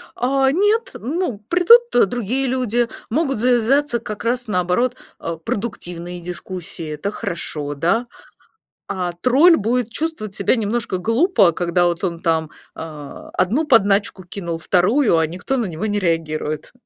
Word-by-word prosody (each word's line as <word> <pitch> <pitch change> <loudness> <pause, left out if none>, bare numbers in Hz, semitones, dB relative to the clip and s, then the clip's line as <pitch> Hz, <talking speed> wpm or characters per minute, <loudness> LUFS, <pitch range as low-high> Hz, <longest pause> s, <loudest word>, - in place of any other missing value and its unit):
А 265 +1 +2
нет, 420 - +1
ну, 280 - -2
придут 360 - +5
другие 245 +4 -1
люди, 245 -2 0 0.2
могут 270 0 0
завязаться, 245 +2 +2
как 210 -1 -7
раз 245 +1 -1
наоборот, 185 +6 +1 0.2
а, 165 -1 -4
продуктивные 175 -2 -5
дискуссии, 175 -2 -5
это 175 +7 -3
хорошо, 150 -6 -4
да? 200 - +1 0.8
А 180 -2 -2
тролль 295 +8 +6
будет 230 +2 -1
чувствовать 300 -11 -3
себя 200 +6 +2
немножко 225 -2 -1
глупо, 230 - +3
когда 175 +1 +1
вот 175 +1 -1
он 170 -3 -2
там, 160 -3 0 0.3
а, 150 -3 -9
одну 250 - +1
подначку 200 -5 +3
кинул, 170 -2 -5
вторую, 185 - +2
а 160 -1 +2
никто 180 - -3
на 235 - 0
него 175 +3 -4
не 205 -1 0
реагирует. 155 -4 -2
210 Hz, 140 wpm, -20 LUFS, 175-255 Hz, 0.8 s, тролль